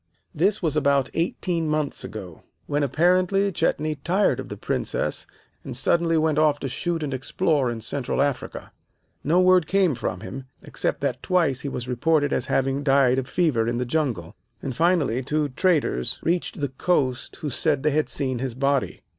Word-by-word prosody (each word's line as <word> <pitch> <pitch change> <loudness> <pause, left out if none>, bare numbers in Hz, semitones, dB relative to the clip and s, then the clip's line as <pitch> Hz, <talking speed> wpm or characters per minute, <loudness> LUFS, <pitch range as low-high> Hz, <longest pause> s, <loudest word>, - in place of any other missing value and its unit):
"This 195 +5 +1
was 155 -3 0
about 140 -3 +2
eighteen 165 -1 -1
months 150 -2 -1
ago, 95 -7 -8 0.2
when 145 +1 -1
apparently 180 +7 +2
Chetney 155 -3 0
tired 180 +8 +1
of - - -6
the - - -6
Princess, - - -2 0.4
and - - -5
suddenly 170 -1 +2
went 155 -1 +2
off 150 -2 +3
to - - -2
shoot 165 +5 -2
and 140 -2 -3
explore 135 +1 0
in 115 -1 -4
Central 135 +2 -3
Africa. 140 -2 -2 0.5
No 165 +5 +3
word 185 -2 +5
came 190 -5 +3
from 95 -6 -4
him, 130 0 -7 0.2
except - - -2
that - - -1
twice 165 -8 +1
he 140 - -3
was 125 -2 -5
reported 145 +4 +1
as 125 - -1
having 135 +1 +1
died 135 -2 +4
of 130 - -5
fever 140 -11 +1
in 120 0 -1
the 125 - -1
jungle, 120 - -2 0.2
and 130 -2 -5
finally 160 -6 +2
two 150 +2 -1
traders 145 - +1
reached 170 -2 -1
the 140 - 0
coast 130 -2 -1
who 150 - -5
said 135 +2 0
they 150 - +3
had 155 +2 +1
seen 130 -4 -2
his 130 -2 -3
body. 140 +1 0
145 Hz, 180 wpm, -24 LUFS, 130-165 Hz, 0.5 s, word